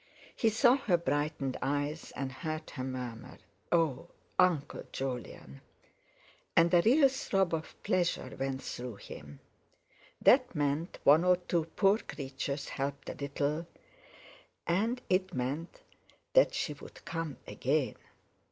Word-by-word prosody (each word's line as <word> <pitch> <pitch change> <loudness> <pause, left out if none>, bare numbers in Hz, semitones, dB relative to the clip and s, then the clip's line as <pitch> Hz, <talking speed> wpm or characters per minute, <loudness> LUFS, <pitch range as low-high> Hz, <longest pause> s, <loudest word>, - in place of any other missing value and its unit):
He 225 - +3
saw 245 +4 +5
her 220 -11 +2
brightened 145 -4 -1
eyes, 145 +3 -2
and 135 -1 -3
heard 155 +4 -5
her 130 - -5
murmur: 125 -3 -6 0.3
"Oh! 165 -6 +2 0.3
Uncle 165 -6 +3
Jolyon!" 125 - -5 0.9
and 170 +1 +5
a 175 - +7
real 275 - +6
throb 195 -9 0
of 160 0 -3
pleasure 175 -8 0
went 135 0 -2
through 125 -2 -5
him. 75 -7 -11 0.8
That 255 -5 +5
meant 145 +3 -1
one 150 +4 +7
or 180 0 +5
two 175 -2 -1
poor 200 +1 +4
creatures 140 - -4
helped 140 +1 -3
a - - -3
little, 145 +2 -2 1.0
and 220 +8 +1
it 185 -2 +1
meant 140 +7 -3 0.5
that - - +5
she - - -1
would - - -13
come 165 -4 -4
again. 135 -3 0
155 Hz, 125 wpm, -32 LUFS, 135-180 Hz, 1.0 s, a